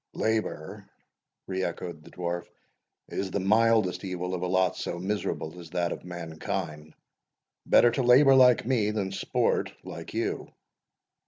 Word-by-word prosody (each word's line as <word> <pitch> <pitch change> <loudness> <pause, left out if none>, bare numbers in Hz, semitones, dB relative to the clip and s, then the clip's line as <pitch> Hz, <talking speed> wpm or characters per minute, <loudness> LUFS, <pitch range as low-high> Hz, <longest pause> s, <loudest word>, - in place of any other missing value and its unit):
"Labour," 110 -8 -2 0.6
re 95 0 -3
echoed 85 -2 -5
the - - -14
Dwarf, 85 -1 -4 0.6
"is 95 - -3
the 100 - -1
mildest 105 -2 +3
evil 90 -1 -3
of 90 - -3
a 90 - -1
lot 95 0 +2
so 85 - -4
miserable 90 -3 -3
as 85 -2 -10
that 85 0 -1
of - - -6
mankind; 80 -2 -5 0.7
better 120 - +6
to 135 - -1
labour 130 +3 +6
like 125 -3 +6
me, 115 -4 +1
than 105 -3 -2
sport 95 - 0
like - - -8
you." - - -2
95 Hz, 145 wpm, -28 LUFS, 85-110 Hz, 0.7 s, better